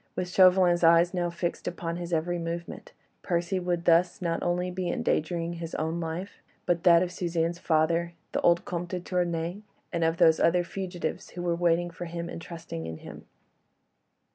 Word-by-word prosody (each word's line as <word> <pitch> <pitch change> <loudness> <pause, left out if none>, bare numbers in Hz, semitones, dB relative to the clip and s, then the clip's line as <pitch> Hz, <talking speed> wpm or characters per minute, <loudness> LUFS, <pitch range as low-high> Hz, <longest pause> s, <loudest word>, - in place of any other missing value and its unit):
With 180 -1 -2
Chauvelin's 180 -1 +5
eyes 170 +2 +5
now 175 -1 0
fixed 170 0 -4
upon 170 -1 -3
his 175 0 -6
every 170 +2 0
movement, 170 +1 -6 0.3
Percy 175 +2 -1
would 175 -1 -2
thus 175 +1 +4
not 170 -2 -1
only 180 +1 0
be 180 -1 -3
endangering 170 +1 -1
his 165 -1 -6
own 160 +2 -2
life, 170 +4 -5 0.2
but 175 -1 0
that 170 0 +7
of 180 - -3
Suzanne's 170 -1 -1
father, 165 +1 +1 0.2
the - - -1
old 170 0 +3
Comte 175 0 -4
de 185 - -3
Tournay, 175 +1 -2 0.3
and 170 -1 0
of 165 +1 +1
those 160 -1 +5
other 175 +1 +3
fugitives 180 0 -5
who 175 - -7
were 175 -1 +1
waiting 175 0 +1
for 175 - -7
him 170 0 -5
and 165 - -7
trusting 165 - -7
in 80 0 -6
him. - - -11
170 Hz, 180 wpm, -28 LUFS, 165-175 Hz, 0.3 s, that